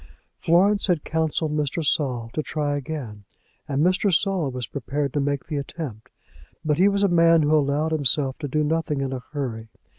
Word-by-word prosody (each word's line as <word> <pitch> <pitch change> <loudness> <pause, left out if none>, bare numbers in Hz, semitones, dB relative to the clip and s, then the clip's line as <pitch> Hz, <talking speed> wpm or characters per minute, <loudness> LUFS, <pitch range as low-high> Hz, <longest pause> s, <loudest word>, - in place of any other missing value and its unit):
Florence 195 +5 +3
had 175 -5 +1
counselled 160 -1 -1
Mr. 150 +1 -1
Saul 125 -6 0
to 155 - -1
try 145 -1 -2
again, 135 -8 -6 0.4
and 140 +3 +1
Mr. 185 +2 +2
Saul 175 -3 +1
was 125 -2 -4
prepared 140 +2 -3
to 145 - 0
make 140 -1 -1
the 150 - -3
attempt; 140 -6 -6 0.6
but 150 0 +1
he 195 +2 +6
was 200 0 0
a - - +5
man 165 -2 +5
who 150 +1 +3
allowed 150 +2 +1
himself 140 -2 +1
to 150 - -3
do 150 +3 0
nothing 150 -2 -1
in 135 -1 -2
a 130 - -4
hurry. 115 -6 -4
150 Hz, 185 wpm, -24 LUFS, 135-165 Hz, 0.6 s, he